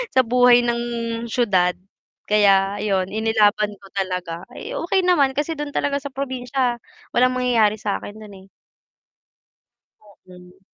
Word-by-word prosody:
sa 260 - +6
buhay 245 0 +5
ng 235 0 0 0.5
siyudad, 190 -7 +1 0.5
kaya 200 -1 +3
'yon 195 -3 0
inilaban 215 -1 +2
ko 195 - -15
talaga, 180 -3 -3
ay, - - -8
okey 370 +2 0
naman 295 -7 +3
kasi 300 +2 -1
do'n 295 -1 -5
talaga 280 0 0
sa 280 0 -7
probinsya, 255 -2 -2 0.4
walang 255 +1 +3
mangyayari 230 -4 +2
sa'kin 205 0 -4
do'n, 210 -2 -12
eh. - - -35 1.5
Oo. 185 -3 -18
220 Hz, 130 wpm, -21 LUFS, 195-255 Hz, 1.5 s, sa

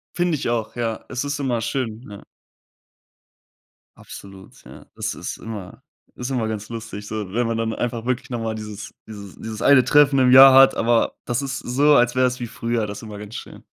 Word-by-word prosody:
Finde 175 -2 +1
ich - - -4
auch, 115 -1 -2
ja. 115 -2 -3
Es 130 +1 -3
ist 145 0 -3
immer 125 -4 -1
schön, 115 0 -4
ja. 100 - -11 1.7
Absolut, 95 -1 -13
ja. - - -13
Es - - -3
ist - - -6
immer 105 -5 -9 0.3
ist 125 +1 -5
immer 120 -4 -1
ganz 110 0 -5
lustig, 110 -3 -7
so, 105 -3 -5
wenn 120 0 0
man 115 0 -2
dann 115 0 -2
einfach 120 -1 -4
wirklich 130 +1 -2
noch 120 - -3
mal 115 -1 -3
dieses 105 -1 -8
dieses 100 -3 -10
dieses 110 -1 -8
1 135 -3 +6
Treffen 140 0 +4
im 125 -1 +4
Jahr 135 +1 +10
hat, 135 0 +7
aber 115 0 +1
das 120 +2 -1
ist 135 -1 -4
so, 145 +5 +2
als 120 -1 +3
wäre 130 0 +3
es 125 +1 -4
wie 120 - -4
früher, 115 -1 -2
das 100 0 -7
ist - - -12
immer 105 -2 -9
ganz 105 +1 -10
schön. - - -10
120 Hz, 210 wpm, -22 LUFS, 110-130 Hz, 1.7 s, Jahr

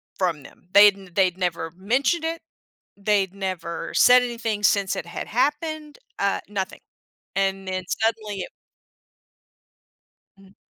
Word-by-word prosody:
from 170 -7 -1
them. 180 - -17
They'd 205 0 +8
n 190 -2 -14
they'd 185 -1 +2
never 170 -2 -2
mentioned 255 - +1
it, 330 0 -3 0.6
they'd 200 -2 +1
never 185 -4 -4
said 250 0 +6
anything 230 -4 -3
since 200 -1 +2
it - - -4
had 170 - -6
happened, 300 +4 -1 0.2
uh, 200 0 +1
nothing. 195 -2 -4 0.6
And 195 0 0
then 185 -1 -3
suddenly 215 -3 -1
it - - -6 1.9
Mhm. 195 0 -19
200 Hz, 130 wpm, -24 LUFS, 185-230 Hz, 1.9 s, They'd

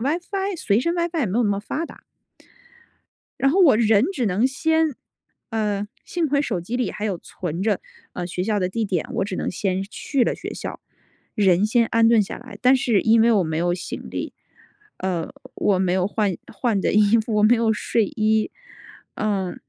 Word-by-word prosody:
WiFi 360 - -2
随 210 -6 +1
身 335 +6 0
WiFi 340 -1 -1
也 260 - +1
没 200 +4 -1
有 245 - +3
那 - - +2
么 200 0 0
发 305 +9 -3
达。 - - -14 1.4
然 275 +1 +3
后 380 +6 +3
我 285 -11 +6
人 220 -1 +4
只 255 - -1
能 205 +6 +2
先 320 +2 +1 0.6
嗯， 210 -2 -1 0.2
幸 335 -4 -1
亏 285 +1 +2
手 190 -10 -2
机 220 +8 -4
里 250 - -1
还 210 - -4
有 195 - -1
存 170 0 -5
着， 210 -2 +1 0.3
呃， 180 - -4
学 180 +1 -3
校 210 0 0
的 180 - 0
地 225 +4 -2
点， 185 -5 -1
我 - - 0
只 200 - -4
能 - - -2
先 190 -1 -1
去 250 +6 -2
了 - - +1
学 - - -7
校， - - -6 0.6
人 190 -2 +3
先 230 +2 +3
安 225 0 +3
顿 230 -2 +5
下 195 - -6
来。 245 +1 -12
但 255 +1 +5
是 235 -5 +2
因 225 0 +4
为 235 +1 +5
我 200 -4 +3
没 160 0 -2
有 175 +1 +1
行 175 - -6
李， - - -5 0.6
呃， 180 -3 -3 0.2
我 195 -3 +1
没 185 -1 +1
有 185 0 +1
换 205 -3 -1 0.2
换 230 -5 0
的 - - +1
衣 210 +1 +5
服， 220 0 -2
我 210 - +3
没 230 +3 +6
有 225 -1 +2
睡 220 +1 0
衣， 220 -3 +1 0.6
呃， 195 -4 -1
215 Hz, 240 characters per minute, -23 LUFS, 195-250 Hz, 1.4 s, 我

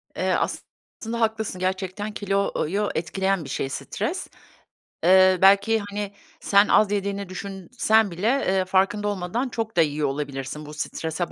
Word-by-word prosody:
Eee, - - 0
aslında 230 +1 -4
haklısın, 220 -4 -1
gerçekten 190 +3 -2
kiloyu 200 -1 -1
etkileyen 190 +2 -1
bir 140 - -9
şey 135 -1 -2
stres. - - -4 0.8
Eee, 185 +1 +6
belki, 200 +3 +5
hani, 205 0 -4 0.3
sen 200 +1 +4
az 210 -1 +4
yediğini 200 -1 -2
düşünsen 200 +3 0
bile, 180 +5 -3 0.2
eee, 190 0 +2
farkında 195 +2 +1
olmadan 205 +6 -2
çok 225 -4 -4
da - - +5
yiyor 150 -2 +1
olabilirsin 140 +1 -5
bu 150 - -9
strese 160 +2 -3
195 Hz, 140 wpm, -24 LUFS, 175-205 Hz, 0.8 s, Eee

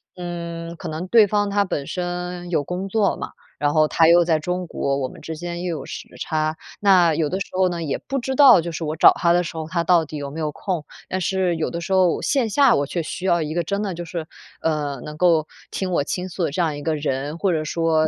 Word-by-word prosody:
嗯， 170 -1 -6
可 170 - -7
能 160 +4 -4
对 220 -1 +6
方 205 0 +1
他 200 0 +2
本 145 -6 -3
身 180 0 -4
有 160 -4 +1
工 180 +6 -4
作 205 0 +2
嘛， - - -6 0.3
然 145 0 +1
后 155 -1 +4
他 165 +1 +4
又 175 +1 +6
在 160 -2 +2
中 180 +3 -3
国， 140 -3 -1
我 130 - -1
们 - - -12
之 160 - -6
间 175 +1 -5
又 175 -3 -2
有 - - -8
时 - - -7
差。 155 0 -1 0.2
那 185 -5 +5
有 155 -1 +1
的 190 - -2
时 - - -2
候 185 0 +2
呢， 170 -1 -3
也 145 -4 -2
不 275 - -4
知 265 +2 -3
道， 270 -7 +8
就 170 - -5
是 165 - -5
我 155 0 -2
找 160 - +8
他 170 -1 +2
的 175 +1 +3
时 165 - -7
候， 160 -1 -4
他 170 0 -1
到 170 -1 +4
底 150 +1 -7
有 140 -1 -5
没 160 - -7
有 155 -1 -1
空。 165 -1 -4 0.2
但 185 - -2
是 185 -1 +1
有 160 - -1
的 170 - -5
时 180 - -6
候 185 -3 +3
线 260 -6 +1
下 280 +6 +5
我 140 - +1
却 170 - -2
需 185 +4 -6
要 170 -2 +3
一 155 +1 -4
个 175 - 0
真 200 +5 -2
的 195 -3 -2
就 175 +1 -6
是， 165 -1 -5 0.4
呃， 150 -4 -1
能 150 - -7
够 165 -3 +3 0.3
听 190 -1 -3
我 145 - +2
倾 180 +5 -3
诉 175 0 -3
的 - - -1
这 155 - -4
样 155 -3 -1
一 145 - -7
个 160 +1 0
人， 145 +1 -3
或 195 +1 +1
者 160 -2 0
说 160 0 +1
170 Hz, 285 characters per minute, -22 LUFS, 155-185 Hz, 0.4 s, 道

